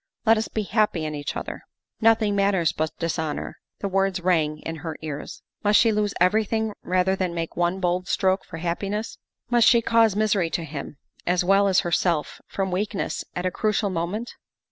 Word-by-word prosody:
Let 225 0 +6
us 220 - -2
be 215 - -2
happy 205 -5 +1
in 155 - -3
each 145 -1 -4
other. - - -6
' - - -63
' - - -65
" - - -40
Nothing 220 -2 +2
matters 195 -5 +2
but 155 0 -1
dishonor." 160 -2 -3 0.2
The 200 - -1
words 195 -1 +1
rang 160 -4 +1
in 165 0 -5
her 160 -1 -6
ears. 150 -2 -6 0.2
Must 205 0 +5
she 230 - +4
lose 210 -1 0
everything 220 +4 +2
rather 185 +1 +1
than 185 -3 -2
make 165 -1 -4
one 175 +2 0
bold 180 0 0
stroke 190 -1 +1
for - - -9
happiness? 195 +6 -3 0.3
Must 240 -2 +5
she 235 - +6
cause 225 -3 +4
misery 210 -5 +2
to 170 0 -2
him 150 -2 -7 0.3
as 180 0 +2
well 195 +2 +4
as 190 -1 +4
herself 170 -3 0
from 190 -1 -2
weakness 200 +2 -2
at 180 - -3
a 185 - +1
crucial 210 0 0
moment? 185 +7 -3
185 Hz, 195 wpm, -24 LUFS, 170-210 Hz, 0.3 s, Let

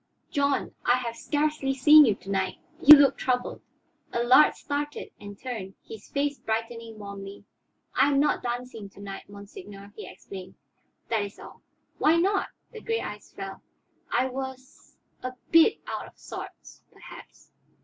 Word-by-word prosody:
"John, 280 -1 0
I 245 - +4
have 240 -2 -3
scarcely 295 -2 -1
seen 300 +3 +8
you 215 -5 +2
to 195 - -9
night. 190 -1 -1 0.2
You 300 +2 +12
look 280 -1 +4
troubled." 250 -1 -1 0.5
Allard 240 +5 +5
started 290 +1 -4
and 205 -1 -10
turned, 220 -7 -6
his 220 -2 -11
face 285 0 -1
brightening 225 0 -4
warmly. 200 -1 -9 0.5
"I 275 - +4
am 275 -1 +2
not 295 - +2
dancing 240 -4 -5
to - - -14
night, 195 -1 -8
monseigneur," 200 0 -11
he - - -8
explained. 190 -2 -10 0.5
"That 225 -2 +1
is 200 0 -6
all." - - -13 0.4
"Why 315 - +4
not?" 390 +4 +2 0.2
The 450 -2 -10
gray 455 0 -1
eyes - - -8
fell. - - -8 0.5
"I 260 - +2
was 260 0 -8 0.2
a 255 0 -5 0.2
bit 330 +6 +6
out - - -5
of - - -18
sorts, - - -10
perhaps." - - -14
250 Hz, 150 wpm, -27 LUFS, 205-285 Hz, 0.5 s, You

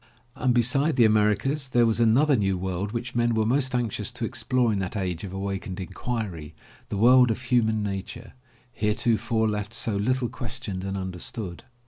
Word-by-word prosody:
And 130 0 +1
beside 135 +6 +2
the 120 -3 +5
Americas 110 +7 +2
there 120 -2 +4
was 115 0 +1
another 130 +6 +4
new 95 -4 +1
world 95 +2 -3
which 120 +2 -4
men 120 -1 +1
were 110 -1 +2
most 130 +2 +1
anxious 115 -4 -1
to 120 -1 -3
explore 125 0 0
in 100 - -1
that 95 +2 -3
age 90 -4 -3
of 95 - -6
awakened 95 -1 -4
inquiry, 95 -5 -5 0.3
the 100 - -3
world 125 +3 +6
of 115 - -1
human 110 -4 +1
nature, 100 -2 -5 0.4
heretofore 110 +1 0
left 105 +1 -3
so 115 -2 -1
little 125 +5 0
questioned 115 -6 -5
and 95 0 -3
under 95 -2 -5
stood. 90 -2 -5
110 Hz, 175 wpm, -25 LUFS, 100-120 Hz, 0.4 s, world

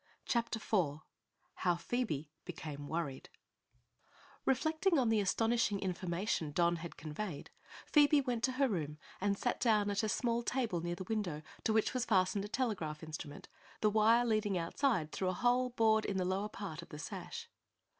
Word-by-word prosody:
CHAPTER 235 -1 0
IV 170 -9 0 0.6
HOW 175 -1 +2
PHOEBE 170 - -2 0.2
BECAME 145 -2 -6
WORRIED 155 -5 -3 1.2
Reflecting 315 +6 +2
on 250 -4 +3
the 220 -1 +3
astonishing 225 +1 +2
information 180 -3 -1
Don 170 +1 +3
had 170 +1 -8
conveyed, 155 +2 -5 0.3
Phoebe 295 -1 +5
went 245 -4 -1
to 260 - -1
her 270 +1 +3
room 155 - -2 0.2
and 200 0 +1
sat 245 - -1
down 210 -4 +3
at 200 - +1
a 215 - 0
small 235 +2 +1
table 235 -8 -1
near 175 +1 -2
the 185 - -6
window 185 -7 -2 0.2
to - - +3
which 220 0 +2
was 250 -2 0
fastened 195 0 +2
a - - -4
telegraph 185 -11 -2
instrument, 155 -2 -7 0.3
the 215 - +4
wire 225 +3 +5
leading 215 -4 +1
outside 170 - 0
through 185 - -1
a - - 0
hole 245 +5 +2
bored 220 -2 +3
in 195 - -1
the 185 - +1
lower 195 +3 -1
part 195 -7 -6
of - - -13
the 150 - -8
sash. 150 - -6
205 Hz, 170 wpm, -35 LUFS, 170-235 Hz, 1.2 s, Phoebe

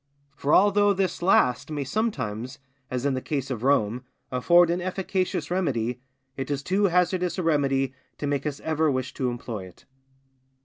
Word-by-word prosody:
For 145 - -1
although 205 +2 +5
this 190 -2 -1
last 130 -7 +3
may 150 -2 -2
sometimes, 130 - -2 0.3
as 130 +1 -3
in 140 - +2
the 130 - -2
case 140 -2 -3
of 120 -4 -3
Rome, 125 -3 +1 0.3
afford 170 +7 +4
an 175 +1 -1
efficacious 185 -3 -2
remedy, 125 -9 -1 0.3
it 135 - -5
is 140 -1 -2
too 195 +6 +1
hazardous 180 -1 +1
a 185 - -1
remedy 135 -4 +1 0.2
to - - -4
make 145 +1 -1
us 145 -1 -4
ever 160 0 +1
wish 130 -2 -2
to 130 -2 -1
employ 115 -5 -5
it. 90 - -18
145 Hz, 170 wpm, -26 LUFS, 130-180 Hz, 0.3 s, although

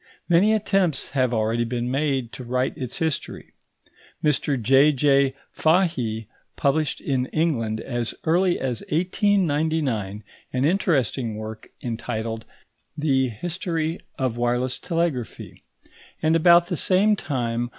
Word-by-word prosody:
Many 190 +6 +4
attempts 195 -8 +1
have 130 -3 +1
already 115 0 +1
been 120 +1 -2
made 135 -4 0
to 135 - -8
write 125 +2 -1
its 125 -2 -4
history. 160 -3 -3 0.7
Mr 145 -2 +1
J.J. 135 +2 +4 0.2
Fahie 155 - +1 0.3
published 145 +1 0
in 130 -2 -1
England 120 -10 0
as 120 -1 -3
early 175 +2 +2
as 125 -3 -2
1899 155 - 0 0.3
an 130 +1 +1
interesting 135 - +1
work 110 0 -8
entitled 110 -1 -4 0.5
the 135 -4 +2
History 165 - -3 0.2
of 130 -3 -1
Wireless 120 +1 0
Telegraphy; 165 - -3 0.6
and 160 +1 +2
about 170 +1 +6
the 175 -1 -3
same 200 +6 +3
time 120 - -2
M. - - -8
135 Hz, 120 wpm, -24 LUFS, 120-165 Hz, 0.7 s, about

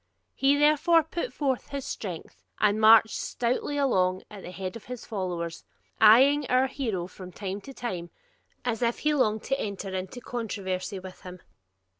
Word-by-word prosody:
He 275 +1 +3
therefore 305 +3 +4
put 340 +9 -4
forth 270 -4 -1
his 280 -2 -5
strength, 180 -6 -7 0.2
and 210 +1 +2
marched 220 0 +7
stoutly 250 +4 -2
along 185 -9 +1
at 205 -2 -9
the - - -8
head 185 0 -6
of 230 - -10
his 250 -1 -7
followers, 175 -5 -4 0.4
eyeing 265 +6 +6
our 255 +1 +3
hero 230 -10 -3
from 185 0 -11
time 195 +1 -5
to 275 - -10
time, 185 -10 -5 0.6
as 235 -2 -1
if 235 0 +1
he 300 0 +1
longed 220 -7 +1
to 270 0 -1
enter 200 -1 -4
into 190 +6 -5
controversy 200 -5 -4
with 185 0 -10
him. 180 0 -10
220 Hz, 165 wpm, -27 LUFS, 185-270 Hz, 0.6 s, marched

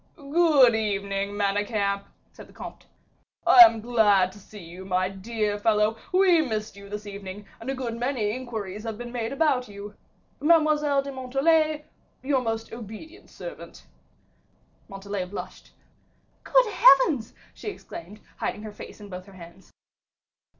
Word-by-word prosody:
"Good 290 -4 +4
evening, 200 -2 -2
Manicamp," 200 0 0 0.3
said - - -13
the - - -19
comte, - - -10 0.6
"I - - +6
am 230 -11 +8
glad 210 -5 +3
to 205 - -14
see 205 -1 -13
you, 175 +3 -10
my 185 0 0
dear 210 +1 -3
fellow; 215 0 +2 0.2
we 365 -3 +5
missed 220 -7 -3
you 200 0 -12
this 210 +1 -6
evening, 200 0 -8
and 230 - -7
a 270 - -1
good 245 -3 -4
many 245 -4 -1
inquiries 215 -5 -6
have 225 -2 -5
been 240 0 -7
made 235 -1 -3
about 275 -4 +1
you. 205 0 -9 0.5
Mademoiselle 300 -3 +3
de 280 - -6
Montalais, 300 +4 +1 0.4
your 265 -1 +1
most 225 -2 -4
obedient 235 - -10
servant." - - -10 1.0
Montalais 195 -1 -5
blushed. 190 +3 -9 0.7
"Good - - +4
heavens!" 325 - +5 0.2
she - - -11
exclaimed, 210 - -10 0.2
hiding 210 - -3
her 215 -1 -8
face 210 - -11
in 205 - -9
both 185 0 -9
her 195 - -14
hands. 175 +1 -14
220 Hz, 145 wpm, -25 LUFS, 200-275 Hz, 1.0 s, am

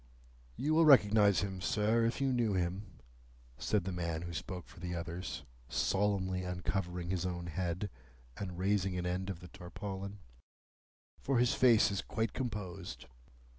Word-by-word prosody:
"You 150 +3 0
will 165 +1 +6
recognise 105 -8 +6
him, 95 -1 -3
sir, 110 +4 +2
if 115 +3 0
you 135 -1 +2
knew 115 -4 +2
him," 95 +2 -1 0.7
said 105 -4 +1
the 95 - -3
man 85 -2 -2
who 85 -1 -5
spoke 90 +2 -5
for - - -14
the 90 0 -4
others, 85 -2 -4 0.3
solemnly 95 -2 +1
uncovering 90 -1 -2
his 90 -2 0
own 90 -1 -3
head, 85 +3 -2 0.5
and 95 -3 -5
raising 95 0 +1
an 90 - -2
end 90 +2 -1
of 90 -3 -5
the 90 - -9
tarpaulin, 100 +2 -6 1.0
"for 135 -2 +1
his 120 0 +4
face 115 -4 +5
is 100 - -1
quite 110 -1 -2
composed." 105 -8 -5
95 Hz, 155 wpm, -34 LUFS, 90-105 Hz, 1.0 s, will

